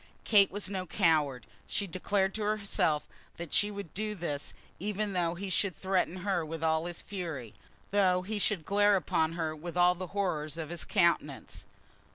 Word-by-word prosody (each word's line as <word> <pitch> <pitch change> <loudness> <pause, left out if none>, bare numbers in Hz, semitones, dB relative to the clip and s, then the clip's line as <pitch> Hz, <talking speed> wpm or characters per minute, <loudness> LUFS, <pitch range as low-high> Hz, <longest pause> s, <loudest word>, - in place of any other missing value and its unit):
Kate 200 -3 +6
was 205 0 -3
no 185 -2 -3
coward. 155 - +2 0.2
She 200 - -1
declared 190 +2 0
to 220 - -4
herself 200 -7 +1 0.3
that 170 -2 -6
she 205 - +4
would 200 -6 -7
do 210 +1 -2
this 150 -6 -4 0.3
even 205 +2 -2
though 175 -2 0
he 190 +2 -5
should 185 -2 +1
threaten 185 0 0
her 190 -4 +1
with 160 +1 -5
all 160 +1 +2
his 175 -1 -7
fury, 160 - -5 0.4
though 185 -3 +3
he 210 +2 -3
should 190 -6 0
glare 205 0 +4
upon 160 -2 +1
her 160 -2 -2
with 170 +3 -7
all 180 0 +6
the 180 +1 -6
horrors 165 -6 -2
of 160 -2 -4
his 175 -1 -3
countenance. 170 -7 +1
180 Hz, 180 wpm, -31 LUFS, 160-200 Hz, 0.4 s, Kate